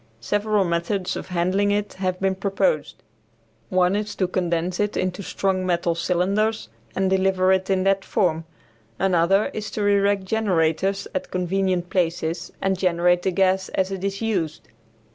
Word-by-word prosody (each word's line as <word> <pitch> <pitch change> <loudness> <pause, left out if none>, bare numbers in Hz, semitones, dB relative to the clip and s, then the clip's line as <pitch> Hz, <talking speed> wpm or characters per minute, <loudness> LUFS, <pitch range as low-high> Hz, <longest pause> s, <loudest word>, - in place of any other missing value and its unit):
Several 205 - +1
methods 175 +3 -1
of - - -6
handling 185 +3 +1
it 205 0 -1
have 185 -1 -2
been 195 0 +1
proposed. 190 -5 -1 0.7
One 185 +1 +2
is 210 0 -3
to 185 - 0
condense 175 -1 -1
it 210 0 0
into 185 +1 -2
strong 190 -1 -1
metal 175 -1 +1
cylinders 185 - 0 0.3
and 190 0 +1
deliver 190 0 +2
it 190 0 0
in 190 -1 +2
that 195 0 +2
form; 165 -6 0 0.5
another 190 +2 +2
is 215 -1 -4
to 210 - -2
erect 200 -1 +2
generators 195 -2 0
at 185 - -3
convenient 185 -1 -1
places 170 -1 -1
and 190 -1 +1
generate 175 -1 +2
the 190 - 0
gas 190 0 +1
as 190 0 0
it 190 -1 -5
is 200 +2 -2
used. 175 -9 -2
190 Hz, 155 wpm, -23 LUFS, 180-195 Hz, 0.7 s, One